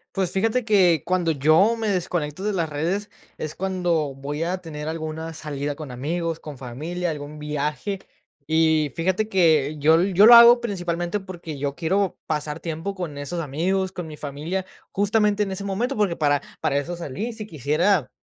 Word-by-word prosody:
Pues, 190 Hz, -3 st, 0 dB
fíjate 225 Hz, +5 st, +1 dB
que 180 Hz, -, +4 dB
cuando 175 Hz, -2 st, +1 dB
yo 155 Hz, -, +4 dB
me 225 Hz, -2 st, -2 dB
desconecto 175 Hz, -3 st, -2 dB
de 210 Hz, 0 st, 0 dB
las 170 Hz, -4 st, -1 dB
redes, 175 Hz, +8 st, -2 dB, 0.3 s
es 155 Hz, -, -4 dB
cuando 175 Hz, -6 st, -1 dB
voy 145 Hz, +3 st, -4 dB
a 180 Hz, +3 st, -1 dB
tener 155 Hz, -3 st, -7 dB
alguna 160 Hz, 0 st, -4 dB
salida 145 Hz, -2 st, -4 dB
con 150 Hz, -3 st, -8 dB
amigos, 165 Hz, +6 st, -3 dB
con 150 Hz, -3 st, -9 dB
familia, 155 Hz, +8 st, -4 dB
algún 150 Hz, 0 st, -7 dB
viaje. 150 Hz, +6 st, -3 dB, 0.5 s
Y 160 Hz, -2 st, +3 dB
fíjate 190 Hz, +5 st, 0 dB
que 160 Hz, -7 st, +3 dB
yo 155 Hz, +2 st, +5 dB
l 185 Hz, +4 st, +2 dB
yo 200 Hz, +4 st, +7 dB
lo 235 Hz, -, +10 dB
hago 235 Hz, +1 st, +9 dB
principalmente 175 Hz, -3 st, -2 dB
porque 175 Hz, -5 st, -8 dB
yo 140 Hz, 0 st, -2 dB
quiero 190 Hz, +4 st, 0 dB
pasar 150 Hz, 0 st, -2 dB
tiempo 165 Hz, +4 st, -4 dB
con 170 Hz, -6 st, -5 dB
esos 170 Hz, +5 st, -4 dB
amigos, 180 Hz, +6 st, -1 dB
con 180 Hz, -3 st, -6 dB
mi 155 Hz, -, -8 dB
familia, 155 Hz, +6 st, -4 dB, 0.3 s
justamente 210 Hz, +1 st, +2 dB
en 195 Hz, -, -4 dB
ese 195 Hz, +1 st, -5 dB
momento, 225 Hz, +7 st, -1 dB
porque 200 Hz, -5 st, +1 dB
para 145 Hz, -3 st, +2 dB, 0.2 s
para 140 Hz, -, +1 dB
eso 165 Hz, +5 st, -2 dB
salí. 175 Hz, -, -5 dB
Si 220 Hz, -1 st, -7 dB
quisiera 155 Hz, -, +1 dB
170 Hz, 180 wpm, -23 LUFS, 150-190 Hz, 0.5 s, lo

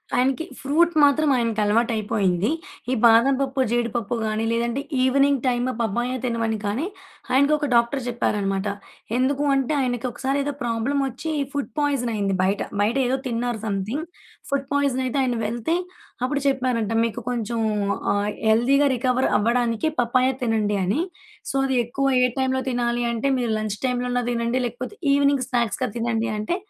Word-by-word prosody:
ఆయనకి 265 Hz, +5 st, +1 dB
ఫ్రూట్ 335 Hz, +5 st, +2 dB
మాత్రం 290 Hz, +1 st, +4 dB
ఆయనకలవాటయిపోయింది. 215 Hz, -4 st, +1 dB, 0.4 s
ఈ -, -, +2 dB
బాదం‌పప్పు, 265 Hz, +4 st, +4 dB
జీడిపప్పు 235 Hz, -1 st, -1 dB
గాని 215 Hz, +1 st, -1 dB
లేదంటే 235 Hz, +3 st, 0 dB, 0.2 s
ఈవినింగ్ 275 Hz, 0 st, +3 dB
టైమ్ 245 Hz, 0 st, +1 dB
పప్పాయ 240 Hz, +3 st, -1 dB
తినమని 230 Hz, -2 st, -1 dB
కానీ 215 Hz, +10 st, -1 dB, 0.5 s
ఆయనకొక 295 Hz, +3 st, +3 dB
డాక్టర్ 235 Hz, +4 st, +2 dB
చెప్పారన్నమాట. 205 Hz, -4 st, -1 dB, 0.5 s
ఎందుకు 275 Hz, +3 st, +1 dB
అంటే 270 Hz, +3 st, 0 dB
ఆయనకొకసారి 255 Hz, +2 st, -1 dB
ఏదో 290 Hz, -, -2 dB
ప్రాబ్లమ్ 240 Hz, +4 st, 0 dB
వచ్చి 265 Hz, +6 st, -5 dB, 0.2 s
ఫుడ్ 285 Hz, -1 st, -3 dB
పాయిజన్ 275 Hz, -5 st, 0 dB
అయింది 200 Hz, -2 st, 0 dB
బయట. 195 Hz, +2 st, +1 dB, 0.2 s
బయట 220 Hz, +6 st, +1 dB
ఏదో 265 Hz, -, +1 dB
తిన్నారు 235 Hz, -1 st, -2 dB
సమ్‌థింగ్. 215 Hz, -, -2 dB, 0.5 s
ఫుడ్ 275 Hz, -1 st, -1 dB
పాయిజన్ 280 Hz, -2 st, +1 dB
అయితే 255 Hz, -, -2 dB
ఆయన 245 Hz, -2 st, 0 dB
వెళ్తే 235 Hz, +9 st, -1 dB, 0.5 s
అప్పుడు 280 Hz, +2 st, 0 dB
చెప్పారంట, 255 Hz, -5 st, 0 dB
"మీకు 230 Hz, +1 st, -3 dB
కొంచెం 235 Hz, -1 st, -2 dB, 0.5 s
ఆహ్, 205 Hz, +1 st, 0 dB, 0.2 s
హెల్థీ 235 Hz, +5 st, +4 dB, 0.2 s
రికవర్ 255 Hz, +1 st, +1 dB
అవ్వడానికి 235 Hz, +3 st, +1 dB
పప్పాయ 250 Hz, +2 st, +3 dB
తినండి 220 Hz, -3 st, +1 dB
అని. 205 Hz, -, +1 dB, 0.5 s
సో, -, -, -4 dB
అది 265 Hz, -, 0 dB
ఎక్కువ 275 Hz, +4 st, -2 dB, 0.2 s
ఏ -, -, +6 dB
టైమ్‌లో 260 Hz, 0 st, +1 dB
తినాలి 240 Hz, -1 st, 0 dB
అంటే 235 Hz, +4 st, -1 dB
మీరు 240 Hz, -3 st, -1 dB
లంచ్‌టైమ్‌లో 245 Hz, +4 st, -2 dB
అన్నా 245 Hz, 0 st, +1 dB
తినండి 235 Hz, +1 st, 0 dB
లేకపోతే 245 Hz, -, -5 dB, 0.2 s
ఈవెనింగ్ 280 Hz, -2 st, +3 dB
స్నాక్స్‌గా 240 Hz, 0 st, 0 dB
తినండి. 230 Hz, -1 st, -1 dB
అంటే 215 Hz, +12 st, -1 dB
245 Hz, 140 wpm, -23 LUFS, 225-265 Hz, 0.5 s, ఏ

